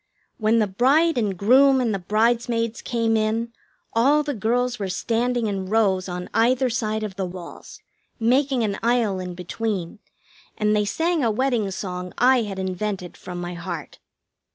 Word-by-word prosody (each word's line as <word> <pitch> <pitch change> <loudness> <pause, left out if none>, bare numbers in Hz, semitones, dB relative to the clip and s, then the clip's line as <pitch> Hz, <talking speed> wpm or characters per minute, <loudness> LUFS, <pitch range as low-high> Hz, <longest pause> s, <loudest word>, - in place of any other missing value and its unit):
When 220 +1 +3
the 220 - +3
bride 270 - +3
and 200 -5 -1
groom 265 +7 +5
and 235 -4 0
the 195 - -2
bridesmaids 230 +3 0
came 230 -2 0
in, 225 +2 0 0.4
all 280 +6 +4
the 290 -1 -2
girls 245 +2 0
were 195 -2 -3
standing 235 +5 0
in 195 -3 -2
rows 195 -4 +2
on 180 0 -5
either 250 +2 +2
side 220 -2 -1
of 200 -3 -6
the 190 - -1
walk, 175 -1 -10 0.5
making 255 +2 +2
an 200 -2 -2
aisle 230 -5 +1
in 180 -1 -6
between, 185 +1 -4 0.6
and 210 0 +2
they 210 0 +2
sang 325 +7 0
a 230 - +3
wedding 230 -2 0
song 180 -1 -5
I 255 +1 +5
had 205 -3 -5
invented 190 -1 -3
from 180 -1 -8
my 175 0 -5
heart. 170 -2 -7
220 Hz, 165 wpm, -23 LUFS, 190-240 Hz, 0.6 s, groom